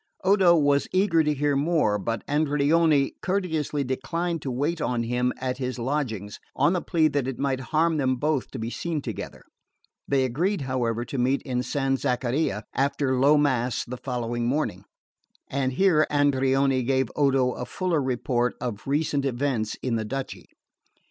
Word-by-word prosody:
Odo 190 -2 +5
was 145 -2 +2
eager 185 -3 +3
to 150 - +1
hear 145 0 +1
more; 140 -8 +1
but 115 +4 -3
Andreoni 150 0 +2
courteously 160 -7 -1
declined 165 +6 -2
to 140 - -4
wait 145 +6 -1
on 120 -4 0
him 125 +2 0
at 130 0 -3
his 130 -1 -3
lodgings, 115 -6 -3 0.2
on 145 +6 +3
the 180 - 0
plea 160 -3 +2
that 140 -4 -1
it 135 -3 -4
might 135 -1 -1
harm 160 +1 +2
them 130 -3 +1
both 145 +1 -1
to - - -7
be 115 +1 -4
seen 160 -1 -3
together. - - -6 0.6
They 135 -2 +2
agreed, 165 - 0
however, 120 -3 -1
to 135 - -4
meet 130 +3 +1
in 125 -3 -1
San 135 +1 0
Zaccaria 125 -3 -1
after 135 -1 0
low 145 +3 +5
mass 130 -5 +1
the 125 +1 -7
next 120 -2 -3
morning, 135 +6 -1 0.6
and 130 -1 -1
here 160 -1 +3
Andreoni 135 -2 +2
gave 130 -1 +1
Odo 135 -3 +2
a 125 - -6
fuller 180 -5 -1
report 125 -1 0
of 115 -3 -5
recent 145 0 0
events 125 -4 -1
in 120 -3 0
the 110 - -2
duchy. 135 +4 -5
135 Hz, 165 wpm, -25 LUFS, 125-150 Hz, 0.6 s, Odo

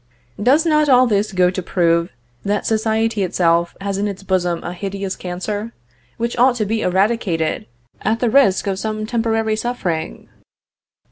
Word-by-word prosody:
Does 275 +9 +4
not 305 -2 +3
all 255 -1 +6
this 210 -2 0
go 180 -1 +3
to 185 - -4
prove, 170 -1 +1 0.3
that 205 +1 -1
society 220 0 0
itself 170 -2 +1
has 195 0 -3
in 205 - 0
its 195 -1 -6
bosom 180 -3 0
a 175 - -5
hideous 195 +1 -4
cancer, 205 +5 -5 0.4
which 235 +1 -2
ought 250 0 +5
to 220 -3 -1
be 220 +2 -1
eradicated 185 -4 0 0.3
at 225 +1 0
the 240 -2 +1
risk 235 -9 +4
of 195 -1 -2
some 215 +1 -3
temporary 225 -1 0
suffering?" 185 - -3
205 Hz, 155 wpm, -19 LUFS, 185-225 Hz, 0.4 s, all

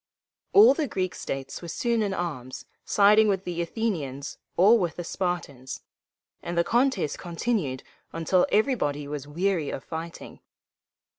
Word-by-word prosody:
All 410 -6 +8
the 300 0 -1
Greek 185 -5 -2
states 135 -1 -5
were 170 - -7
soon 230 +7 0
in 205 -2 0
arms, 150 -9 -5 0.2
siding 210 +2 +5
with 195 -2 +1
the 175 -2 -3
Athenians 165 - -3 0.2
or 210 +6 +6
with 175 -4 -1
the 175 - -5
Spartans; 165 -8 -4 0.6
and 170 0 -5
the 170 - +4
contest 240 - +1
continued 170 - -2 0.3
until 165 +3 +2
everybody 175 - +1
was 145 -1 -5
weary 170 0 0
of 135 - -5
fighting. 165 0 -7
175 Hz, 140 wpm, -26 LUFS, 150-210 Hz, 0.6 s, All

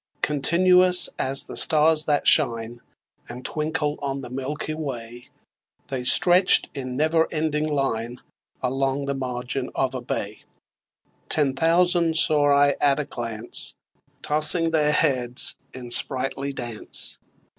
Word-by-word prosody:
Continuous 180 +5 +4
as 135 +1 +1
the - - -11
stars 155 0 +4
that 145 -1 -1
shine 120 -5 +2 0.5
And 125 +1 -10
twinkle 155 -1 -3
on 140 -1 -4
the 125 - -10
milky 135 +4 -5
way, 120 -6 -7 0.6
They 130 -2 -4
stretch'd 175 +7 +4
in 130 -3 -6
never 160 +2 0
ending 155 -1 -2
line 125 -4 -3 0.4
Along 135 +2 -2
the 140 - -2
margin 125 0 -4
of 130 -1 -1
a 130 - -5
bay: 105 -3 -6 0.9
Ten 145 -4 +3
thousand 170 +1 +2
saw 150 -2 +2
I 140 0 +3
at 140 0 +2
a 150 - -3
glance 115 -3 -6 0.5
Tossing 155 +2 +3
their 150 -2 +1
heads 125 -4 0
in 125 -2 -11
sprightly 135 +2 0
dance. 120 -5 -8
140 Hz, 125 wpm, -22 LUFS, 125-155 Hz, 0.9 s, Continuous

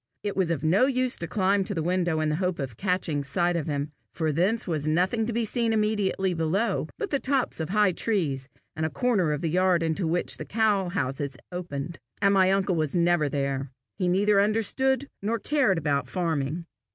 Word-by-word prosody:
It 205 -1 -2
was 190 -3 +1
of 160 -4 -1
no 190 +11 +4
use 255 -2 +1
to 170 - -3
climb 195 +2 +2
to 200 - -3
the 160 - -1
window 175 -2 +1
in 155 - +1
the 155 - 0
hope 180 -1 -1
of 130 -5 -5
catching 180 - -1
sight 175 +5 0
of 165 -3 -2
him, 145 0 -2 0.2
for 160 -2 -1
thence 190 +10 +1
was 155 -3 -1
nothing 185 +8 +1
to - - -1
be 230 0 0
seen 230 +1 0
immediately 205 -3 +1
below 175 +3 0
but 410 - -4
the 280 - +2
tops 265 -7 0
of 160 - -3
high 205 -1 +3
trees 155 - -1 0.3
and 160 - -3
a 160 - +1
corner 185 - +1
of 150 0 -2
the 165 - -1
yard 180 0 +2
into 165 +2 -1
which 175 +2 -1
the - - -5
cow 205 -4 +1
houses 140 -6 -2
opened, 170 -3 -5 0.2
and 200 0 +4
my 190 -1 +4
uncle 195 -1 +1
was 155 -2 -1
never 170 -3 +3
there. 140 -1 -2 0.3
He 180 - +1
neither 200 +3 +3
understood 260 +6 +1
nor 220 +4 0
cared 255 - +1
about 140 -4 0
farming. 165 0 -2
180 Hz, 205 wpm, -26 LUFS, 155-205 Hz, 0.3 s, no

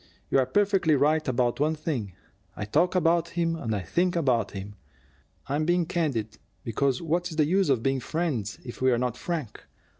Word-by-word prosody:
"You're 130 -2 +3
perfectly 195 -1 +3
right 150 +3 +2
about 125 -1 +1
one 155 +2 +2
thing: 130 - -3 0.4
I 105 - -4
talk 165 - +2
about 170 -1 +2
him 165 -1 +1
and 115 -9 -2
I 100 - -2
think 175 - 0
about 125 -10 +1
him. 100 +1 -7 0.7
I'm 145 +3 -1
being 175 +1 +2
candid, 135 - -2 0.2
because 130 +5 0
what's 170 +1 -1
the 155 -1 +3
use 190 +2 +2
of 125 -4 +2
being 135 0 +1
friends 130 - -2
if 120 - -8
we're 130 -2 +3
not 125 -1 -1
frank? 155 -6 -4
145 Hz, 175 wpm, -27 LUFS, 120-170 Hz, 0.7 s, You're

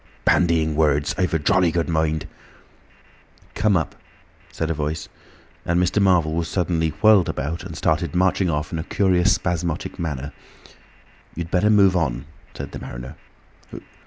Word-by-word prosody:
"Bandying 80 -3 +2
words! 75 -2 +2
I'm 90 -2 0
a 80 - +2
jolly 90 +3 +2
good 85 0 -1
mind—" 80 -1 0 1.3
"Come 105 -3 +2
up," 80 - -3 0.6
said 80 0 -2
a - - +1
Voice, 75 +1 -4 0.5
and 85 +1 +1
Mr. 90 +3 +1
Marvel 90 -5 +3
was 85 0 -1
suddenly 85 -2 0
whirled 105 -4 +6
about 75 +5 -3
and - - -8
started 80 0 0
marching 90 0 +2
off 75 -1 -2
in 80 - -3
a - - -3
curious 95 +1 +2
spasmodic 85 -2 -3
manner. 75 -3 -4 1.0
"You'd 85 0 -5
better 95 +3 +2
move 100 -3 +5
on," 70 -7 -1 0.3
said - - -7
the - - -7
mariner. - - -8
85 Hz, 150 wpm, -22 LUFS, 80-90 Hz, 1.3 s, whirled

